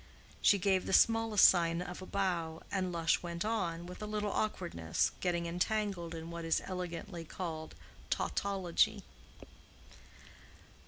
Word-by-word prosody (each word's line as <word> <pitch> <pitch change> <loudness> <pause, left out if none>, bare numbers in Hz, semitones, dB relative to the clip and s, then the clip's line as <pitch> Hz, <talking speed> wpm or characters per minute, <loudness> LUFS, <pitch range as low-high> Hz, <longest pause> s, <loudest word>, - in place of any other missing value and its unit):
She 205 - +6
gave 190 -1 +1
the - - -1
smallest 225 -2 +6
sign 170 -2 +3
of 180 +1 -6
a 185 - -8
bow, 170 -5 -1
and 185 -2 -1
Lush 165 -1 +1
went 170 +1 -4
on, 175 -7 -1
with 180 +3 -9
a 210 - -4
little 210 -1 -2
awkwardness, 170 - -1
getting 170 -2 0
entangled 180 -1 -1
in 165 +1 -7
what 170 0 -5
is 165 0 +2
elegantly 175 -1 -5
called 160 -1 -6 0.3
tautology. 195 -4 +1
180 Hz, 130 wpm, -33 LUFS, 170-195 Hz, 0.3 s, She